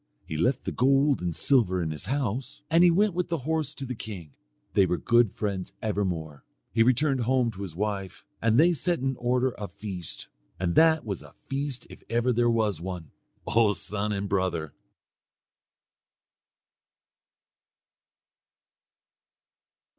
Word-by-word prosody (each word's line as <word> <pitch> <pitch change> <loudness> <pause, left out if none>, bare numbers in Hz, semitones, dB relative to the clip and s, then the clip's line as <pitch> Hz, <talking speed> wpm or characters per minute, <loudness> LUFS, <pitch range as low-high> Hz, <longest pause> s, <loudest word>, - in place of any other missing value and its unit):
He 80 - -5
left 125 - +1
the - - -3
gold 135 +1 +3
and 85 -2 -2
silver 110 -10 +3
in 80 -3 -1
his 75 - -6
house, 135 +1 -2
and 165 +2 +6
he 180 - +7
went 200 +3 +3
with 180 +1 -2
the 170 - 0
horse 155 -2 -1
to 135 - -5
the 130 - -4
king. 95 - -8 0.4
They 95 - +4
were 90 - 0
good 120 +4 +4
friends 95 -2 -4
evermore. 90 -9 -2 0.3
He 115 - +3
returned 130 +3 +3
home 125 0 +2
to 100 -2 -10
his 95 -5 -6
wife, 100 -1 -3 0.2
and 115 +1 +3
they 175 +3 +6
set 175 +2 0
in 135 +1 -1
order 125 +1 +1
a 105 - -4
feast; 95 -7 -7 0.3
and 85 -2 0
that 160 - +5
was 100 -5 -4
a - - -15
feast 135 -1 -3
if - - -13
ever 120 +2 +2
there 120 +1 +3
was 110 -7 +1
one, 90 -4 -6 0.3
O 110 -2 +3
son 105 +4 -3
and 100 -1 -2
brother. 90 -6 -1
115 Hz, 150 wpm, -27 LUFS, 95-135 Hz, 0.4 s, he